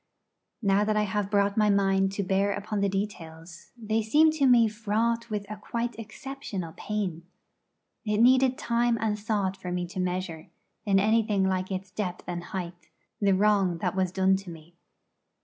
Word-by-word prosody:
Now 200 0 +3
that 215 0 0
I 210 - +3
have 205 0 -2
brought 200 -1 +2
my 210 -1 +4
mind 195 -1 +2
to 200 - -2
bear 195 +2 +1
upon 205 +1 -3
the 200 - +2
details, 170 -4 -6
they 220 -1 -1
seem 300 +9 +4
to 295 -3 +2
me 240 -3 +6
fraught 230 +2 -1
with 210 -2 -3
a 215 - -7
quite 235 +3 -3
exceptional 225 - -7
pain. 200 -6 -3 0.8
It 210 -2 0
needed 255 +2 +4
time 235 0 +1
and 215 -1 -1
thought 205 -3 -1
for 180 -2 -7
me 180 0 -2
to 185 - -6
measure, 180 -3 -3 0.4
in 195 -1 +4
anything 215 -1 +2
like 185 0 -1
its 190 -1 -5
depth 185 -3 -4
and 175 -1 -5
height, 175 -3 -7 0.3
the 200 -2 +3
wrong 195 -3 +2
that 180 +2 -2
was 185 -2 0
done 190 0 +3
to 195 -1 -10
me. 165 0 -12
200 Hz, 175 wpm, -27 LUFS, 185-220 Hz, 0.8 s, me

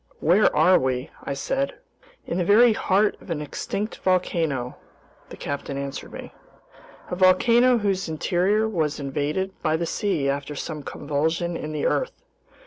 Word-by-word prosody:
"Where 185 +6 +4
are 185 0 +5
we?" 130 0 -2
I 140 - -3
said. 270 - -2 0.5
"In 175 - -2
the - - +2
very 220 +5 +6
heart 205 +1 +2
of - - -15
an 165 -3 -2
extinct 195 +8 -4
volcano," 165 -8 0 0.5
the - - -10
captain 140 -1 -4
answered 140 0 -6
me, - - -9 0.8
"a - - -1
volcano 235 +7 +5
whose 195 -5 -1
interior 185 +7 +1
was 160 -9 -1
invaded 145 +7 -2
by 155 +1 +1
the 170 - -2
sea 175 -6 -1
after 140 +1 -2
some 150 +1 -5
convulsion 160 +5 -2
in 155 -1 -5
the 150 -1 -2
earth. - - -1
170 Hz, 150 wpm, -24 LUFS, 145-200 Hz, 0.8 s, very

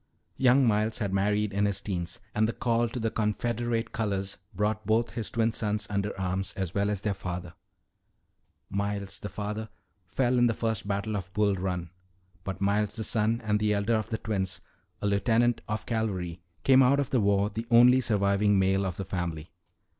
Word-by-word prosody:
Young 130 +1 +5
Miles 110 0 +1
had 100 -3 -2
married 105 +1 +1
in 100 +1 +2
his 100 -1 0
teens, 85 -4 -4
and 110 +1 +2
the 115 - -2
call 120 -1 +1
to 125 - -4
the 115 -1 -1
Confederate 115 +2 -1
colors 100 -4 -2
brought 105 +2 -1
both 115 +1 +2
his 115 -3 -4
twin 115 0 +1
sons 105 -2 -1
under 100 0 -2
arms 95 +1 -2
as 95 -3 -3
well 100 0 +1
as 105 -2 -2
their 105 -1 0
father. 90 -2 -6 1.1
"Miles, 100 0 -3
the 100 - -6
father, 105 +1 -4 0.4
fell 125 +3 +1
in 120 - +5
the 115 - 0
First 110 -3 -2
Battle 100 +1 -1
of 95 -2 -5
Bull 105 -1 +2
Run. 90 -3 -3 0.5
But 95 0 -5
Miles, 100 +1 +1
the 110 - -3
son 110 +1 +1
and 105 -1 +1
elder 105 +1 +1
of 110 -1 0
the 110 - -1
twins, 95 -4 -2 0.4
a - - 0
lieutenant 115 +4 +2
of 105 0 -3
cavalry, 95 -7 -2 0.2
came 135 0 +6
out 135 +2 +4
of 140 - -1
the 125 - +3
war 100 +1 +2
the 115 +3 -5
only 125 +2 +7
surviving 100 -2 +2
male 95 0 +2
of 90 - -5
his 100 - -4
family. 85 -4 -4
105 Hz, 185 wpm, -28 LUFS, 100-115 Hz, 1.1 s, only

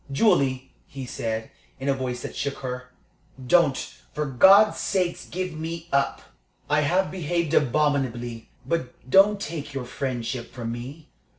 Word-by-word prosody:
"Julie," 135 - +2 0.2
he 135 -1 -7
said, 110 -2 -4 0.3
in 135 - -4
a 140 - +4
voice 125 -2 -4
that - - -6
shook 140 -1 -2
her, 125 0 -5 0.6
"don't, 150 -1 +4 0.4
for 150 - -1
God's 190 - +6
sake, 180 -3 -1
give 185 0 -3
me 165 +1 -6
up! 140 0 +1 0.4
I 150 +1 +3
have 180 +6 +1
behaved 170 -2 -1
abominably, 125 -5 +1 0.2
but 130 -7 -3
don't 200 +7 +5
take 145 -5 -5
your 130 -2 -3
friendship 125 -1 -4
from 115 -2 -5
me. 130 +7 -8
140 Hz, 140 wpm, -25 LUFS, 125-170 Hz, 0.6 s, God's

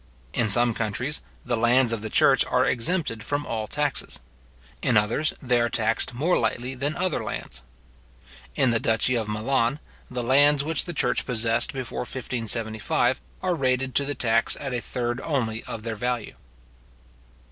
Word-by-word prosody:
In 115 -3 +1
some 120 +3 +4
countries, 115 +7 -3 0.2
the 125 - 0
lands 120 +1 +3
of 115 - -3
the 110 - -4
church - - +5
are - - +2
exempted 125 -3 0
from 145 +5 -2
all 110 -2 -3
taxes. 145 +1 -1 0.6
In 120 - +3
others, 115 +9 +2
they 125 -2 +2
are 120 - +1
taxed 115 +2 0
more 160 +8 +2
lightly 125 +2 -1
than 140 +4 -2
other 185 -2 -1
lands. 60 0 -5 0.9
In 130 -4 +3
the 115 - +2
duchy 110 +3 +1
of 115 -3 -1
Milan, 115 +5 0 0.3
the 125 -1 -3
lands 140 +3 +4
which 160 0 0
the 175 - -5
church - - 0
possessed 115 -1 +1
before 130 -3 -5
1575, 120 -1 -1 0.2
are 185 -1 +2
rated 130 -3 0
to 140 - +3
the 145 +1 -3
tax 115 -1 +2
at 135 -3 -4
a 120 - -1
third 120 +1 -2
only 115 -7 -1
or - - -4
their 110 0 -5
value. 120 0 -2
120 Hz, 165 wpm, -25 LUFS, 115-135 Hz, 0.9 s, church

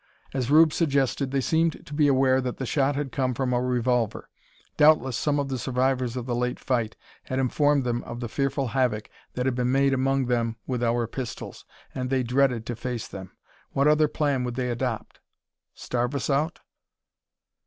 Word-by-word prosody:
As 130 -2 -1
Rube 155 +1 +6
suggested, 140 -3 +1
they 135 0 0
seemed 160 +4 0
to 150 - -10
be 145 0 +3
aware 130 -1 +3
that 125 -1 -4
the 130 - -3
shot 140 +2 +1
had 140 -2 -3
come 130 -2 -1
from 125 0 -1
a 120 - +1
revolver. 125 -2 0 0.4
Doubtless 150 -5 +4
some 145 +3 0
of 140 -1 -2
the 130 -2 -2
survivors 130 0 0
of 125 - -4
the 125 - -2
late 125 +1 -1
fight 120 -4 -1 0.3
had 130 - -3
informed 140 +2 +2
them 120 -1 -1
of 120 - -7
the 120 - -3
fearful 135 +1 -1
havoc 115 -3 0 0.2
that 125 - -2
had 130 - +1
been 125 0 0
made 135 0 +3
among 135 0 +1
them 115 -2 0
with 125 -2 -2
our 120 0 +1
pistols, 120 +1 -7 0.3
and 125 -1 -3
they 130 -1 +1
dreaded 125 -2 +1
to 120 - -4
face 120 0 -4
them. 95 -1 -9 0.4
What 140 +1 +3
other 150 0 +4
plan 145 -4 0
would 125 -1 -3
they 125 -1 -1
adopt? 120 -1 -3 0.6
Starve 125 +2 -2
us 140 - -1
out? 150 +5 0
130 Hz, 190 wpm, -26 LUFS, 120-140 Hz, 0.6 s, Rube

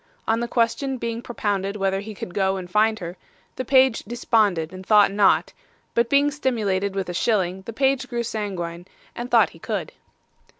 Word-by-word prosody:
On 225 +1 +2
the 235 - -2
question 250 +3 0
being 230 -1 -4
propounded 205 -4 -2
whether 195 -1 0
he 210 +1 -8
could 180 - -7
go 190 0 +1
and 185 -1 -6
find 215 +4 +2
her, 175 -2 -7 0.4
the 255 - -3
page 260 -1 +4
desponded 205 -7 +1
and 185 0 -8
thought 205 0 +5
not; 200 0 +3 0.4
but 235 0 +2
being 280 +2 +3
stimulated 205 -9 -1
with 195 -2 -2
a 180 - -4
shilling, 190 -2 0
the - - -3
page 265 +1 +1
grew 235 -1 -2
sanguine 185 -6 -4 0.3
and 240 +1 -5
thought - - +4
he - - -16
could. - - -4
210 Hz, 180 wpm, -23 LUFS, 190-235 Hz, 0.4 s, thought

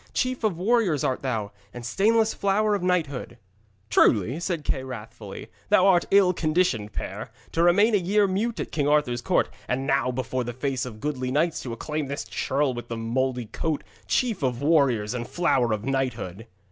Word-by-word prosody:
Chief 255 -2 -1
of 205 -6 +1
warriors 190 - +2
art 130 - 0
thou, 110 -6 -2 0.2
and 120 -1 -7
stainless 220 - +2
flower 205 +2 +1
of 200 - 0
knighthood!' 155 -9 -1 0.5
'Truly,' 110 - +3
said 170 -3 -2
Kay 135 -2 -1
wrathfully, 110 -5 -8 0.2
'thou 200 -2 +5
art 180 -3 +4
an - - -25
ill 195 -2 +5
conditioned 155 - 0
pair, - - -5 0.2
to 165 - 0
remain 200 +6 +5
a - - +6
year 200 +3 +2
mute 205 +5 -1
at - - -4
King 145 -2 0
Arthur's 145 -5 +2
court, - - +1 0.2
and 130 +2 -1
now 135 -2 +2
before 130 0 -2
the 120 0 -5
face 130 0 -2
of 110 -3 -10
goodly 130 -4 -2
knights 155 +5 +1
to 125 - -6
acclaim 150 +4 -3
this 140 +1 -4
churl 135 0 -1
with 120 0 -7
the 115 - -4
mouldy 125 +2 -1
coat, 155 +7 -3 0.2
chief 235 -8 0
of 130 -1 -1
warriors 135 -9 +3
and 120 -1 -4
flower 135 -9 +1
of 110 0 -2
knighthood!' 125 -6 -2
140 Hz, 185 wpm, -25 LUFS, 120-180 Hz, 0.5 s, a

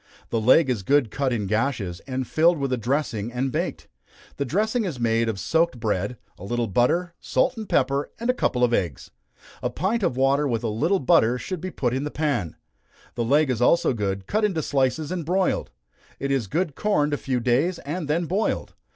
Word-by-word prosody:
The 115 - 0
leg 130 +7 +5
is 125 -6 -1
good 130 +2 +2
cut 135 -2 -1
in 110 -4 -1
gashes, 110 -4 -1
and 130 -1 -2
filled 165 +6 +3
with 135 -2 -1
a - - +1
dressing, 120 -3 -1
and 130 +2 -1
baked. - - -3 0.5
The 140 - -1
dressing 220 - 0
is 165 -11 -4
made 115 -1 +1
of 105 -3 -3
soaked 165 - +1
bread, 105 +2 -1 0.2
a - - -10
little 120 +4 -1
butter, 145 - +1
salt, 260 - +1
and 220 -3 -7
pepper, 140 +1 +1
and 235 - -3
a 250 - +4
couple 125 - 0
of 120 -1 +3
eggs. 85 - -2 0.5
A 125 - 0
pint 195 - -1
of 170 -10 0
water 140 +2 +3
with 115 -3 -1
a 115 - 0
little 155 - +1
butter 120 -1 +3
should 180 +5 -5
be 185 - -4
put 125 -8 -1
in 130 +2 -1
the 150 - -2
pan. 140 - -1 0.6
The 120 - -2
leg 140 +4 +3
is 120 -2 -2
also 135 +2 +4
good, 100 -3 -2
cut 215 +2 0
into 185 -7 +1
slices 135 +3 0
and 180 -2 -2
broiled. 185 +4 0 0.5
It 140 0 -2
is 130 -6 0
good 165 - -1
corned 150 -6 +1
a - - +1
few 130 -3 -1
days, 130 +9 +1
and 155 +2 -5
then 165 +3 0
boiled. 190 +7 -1
135 Hz, 210 wpm, -24 LUFS, 120-165 Hz, 0.6 s, leg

